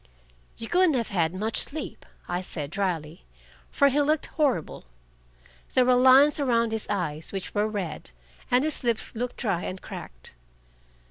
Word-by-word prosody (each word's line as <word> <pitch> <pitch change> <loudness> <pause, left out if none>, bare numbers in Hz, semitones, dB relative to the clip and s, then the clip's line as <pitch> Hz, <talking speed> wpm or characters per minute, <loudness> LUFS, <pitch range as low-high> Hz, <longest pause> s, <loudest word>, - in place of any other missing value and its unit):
"You 225 - -6
couldn't 355 -1 +3
have 235 -3 -1
had 170 -5 +1
much 215 +4 -2
sleep," 310 +2 -4 0.2
I 175 +1 -2
said 150 -5 -5
dryly. 170 -4 -3 0.5
For 280 -1 +3
he 285 +2 +2
looked 300 +1 +1
horrible. 265 - -1 0.9
There 255 -1 +5
were 250 - +5
lines 260 +4 +6
around 235 -5 +1
his 220 -1 -2
eyes, 165 -6 -2
which 195 -2 -5
were 205 +1 +1
red, 195 -7 -5 0.4
and 250 +2 +3
his 310 -3 -2
lips 235 -2 0
looked 245 +2 -4
dry 195 -8 -1
and 185 - -5
cracked. - - -9
225 Hz, 155 wpm, -26 LUFS, 180-260 Hz, 0.9 s, lines